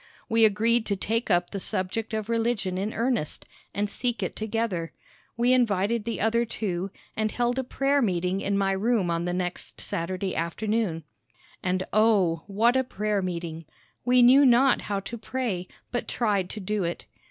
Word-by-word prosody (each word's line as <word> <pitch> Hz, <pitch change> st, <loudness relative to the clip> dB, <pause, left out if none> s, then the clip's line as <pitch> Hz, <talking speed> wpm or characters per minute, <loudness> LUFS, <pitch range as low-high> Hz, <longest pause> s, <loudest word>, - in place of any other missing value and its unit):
We 225 Hz, -1 st, +5 dB
agreed 225 Hz, +2 st, +2 dB
to 200 Hz, -, +1 dB
take 225 Hz, +4 st, -1 dB
up 175 Hz, 0 st, +2 dB
the 200 Hz, -, -3 dB
subject 190 Hz, +5 st, -2 dB
of 215 Hz, -1 st, -2 dB
religion 230 Hz, -5 st, 0 dB
in 205 Hz, +3 st, -2 dB
earnest, 230 Hz, -, -1 dB, 0.3 s
and 205 Hz, +1 st, -1 dB
seek 240 Hz, +3 st, -2 dB
it -, -, -3 dB
together. 215 Hz, -6 st, -2 dB, 0.4 s
We 245 Hz, +2 st, +4 dB
invited 220 Hz, -2 st, +2 dB
the 230 Hz, -, -3 dB
other 225 Hz, +2 st, +2 dB
two, 195 Hz, -5 st, -3 dB, 0.3 s
and 215 Hz, 0 st, 0 dB
held 245 Hz, +3 st, 0 dB
a -, -, 0 dB
prayer 275 Hz, +2 st, +1 dB
meeting 185 Hz, -3 st, 0 dB
in 200 Hz, 0 st, 0 dB
my 195 Hz, -1 st, +2 dB
room 195 Hz, -2 st, +1 dB
on 170 Hz, 0 st, -1 dB
the 175 Hz, -, -1 dB
next 180 Hz, -1 st, -4 dB
Saturday 185 Hz, +3 st, -3 dB
afternoon. 175 Hz, +1 st, -1 dB, 0.6 s
And, 185 Hz, -1 st, 0 dB
O, 200 Hz, -6 st, +3 dB
what 225 Hz, +5 st, +3 dB
a 260 Hz, -, +3 dB
prayer 210 Hz, -4 st, -1 dB
meeting! 170 Hz, -3 st, -4 dB, 0.4 s
We 250 Hz, 0 st, +5 dB
knew 260 Hz, +4 st, +7 dB
not 255 Hz, +1 st, +5 dB
how 200 Hz, -1 st, -1 dB
to 235 Hz, +4 st, -7 dB
pray, 220 Hz, -8 st, -3 dB, 0.2 s
but 240 Hz, -, -2 dB
tried 205 Hz, -6 st, 0 dB
to 215 Hz, -, -5 dB
do 205 Hz, 0 st, -1 dB
it. 170 Hz, 0 st, -3 dB
210 Hz, 175 wpm, -26 LUFS, 185-235 Hz, 0.6 s, knew